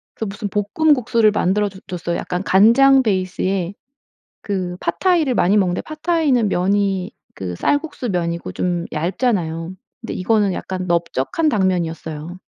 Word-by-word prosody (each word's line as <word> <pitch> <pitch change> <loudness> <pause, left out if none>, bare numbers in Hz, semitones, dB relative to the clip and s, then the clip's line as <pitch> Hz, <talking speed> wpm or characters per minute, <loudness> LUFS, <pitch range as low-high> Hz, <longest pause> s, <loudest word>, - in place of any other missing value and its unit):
그 220 - -3
무슨 205 +1 -5
볶음 210 +11 +2
국수를 230 -4 +2
만들어 205 0 +1
줘 190 -1 -13
줬어요. 175 -1 -3
약간 180 0 -3
간장 260 +8 +5
베이스에 185 -2 -1 0.7
그 185 -3 -3
팟타이를 315 - +1
많이 195 +2 +3
먹는데 185 -3 +1
팟타이는 310 -7 +1
면이 195 +1 0 0.2
그 90 -2 -5
쌀국수 285 - -1
면이고 170 -2 -2
좀 175 -1 -1
얇잖아요. 170 -1 -1 0.3
근데 230 - -6
이거는 205 +1 +1
약간 185 0 -4
넓적한 170 - 0
당면이었어요. 175 - -2
195 Hz, 320 characters per minute, -20 LUFS, 175-230 Hz, 0.7 s, 간장